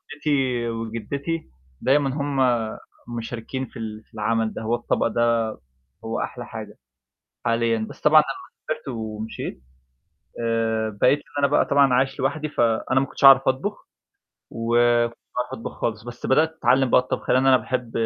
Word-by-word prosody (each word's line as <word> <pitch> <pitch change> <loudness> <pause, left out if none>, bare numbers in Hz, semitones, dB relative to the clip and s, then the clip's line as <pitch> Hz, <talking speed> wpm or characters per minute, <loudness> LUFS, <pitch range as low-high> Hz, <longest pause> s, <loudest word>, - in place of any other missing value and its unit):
جدتي 130 -5 0
وجدتي 115 +8 -4 0.3
دايمًا 135 +2 +3
هُم 140 -1 -2 0.8
مشاركين 120 +3 -5
في 120 - -12
ال 110 -1 -6
في - - -37
العمل 110 +1 0
ده، - - -6
هو 115 +2 0
الطبق 120 -1 0
ده 115 -2 +1 0.5
هو - - -2
أحلى - - -5
حاجة - - -8 0.7
حاليًا 115 -1 +1
بس - - -12
طبعًا 155 0 +7
لمّا 135 - -5 0.3
سافرت 155 -2 -4
ومشيت 110 - -5 0.8
آآ، 115 -1 0
بقيت 140 - +5
اللي - - -21
أنا 140 - +4
بقى 145 - +3
طبعًا 140 -2 +4
عايش 130 +2 +1
لوحدي، 150 +3 -1
فأنا 120 +1 +1
ما 135 - +1
كنتش 140 - -8
أعرف 135 0 +8
أطبخ، 135 +11 -1 0.6
وماكنتش 120 +1 +2 0.2
باعرف 125 0 -2
أطبخ - - -6
خالص 110 -1 -2
بس 120 0 -8
بدأت 155 +4 +3
أتعلّم 130 +1 +3
بقى - - +5
الطبخ 130 - -5
لأن 130 +1 +4
أنا 130 -1 +7
باحب 125 -3 -3
120 Hz, 155 wpm, -23 LUFS, 115-135 Hz, 0.8 s, أعرف